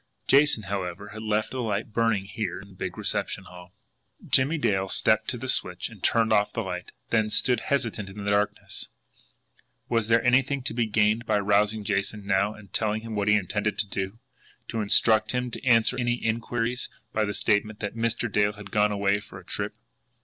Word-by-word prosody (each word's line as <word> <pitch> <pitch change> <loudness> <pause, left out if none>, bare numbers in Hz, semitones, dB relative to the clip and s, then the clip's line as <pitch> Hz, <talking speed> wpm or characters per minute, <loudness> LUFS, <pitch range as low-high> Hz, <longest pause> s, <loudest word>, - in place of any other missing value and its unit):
Jason, 140 -5 +4
however, 95 0 -4
had 110 +1 -8
left 110 0 0
the 130 - -3
light 110 0 -2
burning 115 -4 +1
here 100 -3 -4
in 100 +1 -13
the - - -15
big 95 - -5
reception - - -2
hall. 90 0 -13 0.6
Jimmie 140 +5 +3
Dale 95 -9 0
stepped 110 +2 +2
to 125 - -1
the 130 +2 -6
switch 90 -7 +1
and 110 -5 -14
turned 115 +1 +3
off 105 -1 +3
the 115 - -2
light; 90 -2 -5 0.2
then 110 -2 +2
stood 125 +2 +2
hesitant 115 -8 -1
in 100 +1 -8
the 100 - +1
darkness. 100 0 -1 1.0
Was 115 -2 +1
there 115 +1 +3
anything 135 +2 +3
to 130 - -2
be 120 -1 0
gained 110 +2 +2
by 105 - +3
rousing 105 +1 +2
Jason 100 0 -2
now 100 +1 +2
and 100 -4 -15
telling 110 0 0
him 115 -1 -6
what 100 -1 -1
he 105 - +5
intended 105 +2 -1
to 105 - 0
do 95 +1 -4 0.5
to 115 - -2
instruct 110 +2 +3
him 125 -1 -1
to - - -7
answer 115 -1 +4
any 120 -1 +1
inquiries 115 +1 -2 0.2
by 110 - +1
the 105 -1 -2
statement 105 0 +1
that 105 -2 -3
"Mr. 115 +1 0
Dale 105 0 +2
had 105 -1 -11
gone 105 0 +3
away 100 0 +1
for 105 - -12
a - - -16
trip"? - - -3
105 Hz, 200 wpm, -26 LUFS, 100-115 Hz, 1.0 s, he